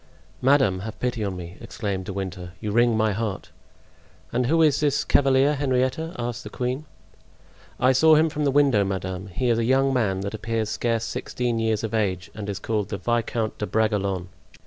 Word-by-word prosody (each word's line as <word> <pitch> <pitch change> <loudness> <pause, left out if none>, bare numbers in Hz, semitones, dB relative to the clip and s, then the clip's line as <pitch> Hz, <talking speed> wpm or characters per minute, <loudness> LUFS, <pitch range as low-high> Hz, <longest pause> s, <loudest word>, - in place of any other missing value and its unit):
"Madame, 130 -8 +3
have 110 +3 -7
pity 120 -3 -1
on 95 -3 -3
me," 90 +2 -8
exclaimed 100 -4 -4
De - - -5
Winter; 90 -2 -5
"you 105 - -3
wring 120 +1 +3
my 110 -1 +2
heart!" 105 -1 -4 0.8
"And 125 0 +1
who 165 +3 +4
is 150 -3 +3
this 145 -1 +1
cavalier, 135 +1 +3
Henrietta?" 135 +3 0
asked 120 0 -4
the - - -7
queen. 130 +4 -3 0.9
"I 130 - +5
saw 155 +4 +6
him 155 +2 +4
from 150 -1 -3
the 145 - +3
window, 135 -7 +4
madame; 95 0 -3
he 120 +7 -1
is 115 -1 +2
a - - +1
young 135 +3 +3
man 100 -7 +1
that 100 +1 -4
appears 110 0 -2
scarce 115 0 -1
sixteen 120 0 -2
years 110 -1 0
of 110 0 -3
age, 95 -5 -1
and 105 -1 -6
is 100 - -3
called 105 0 -2
the 100 - -3
Viscount 115 +1 -1
de 105 - -2
Bragelonne." 100 -4 0
115 Hz, 190 wpm, -24 LUFS, 100-130 Hz, 0.9 s, saw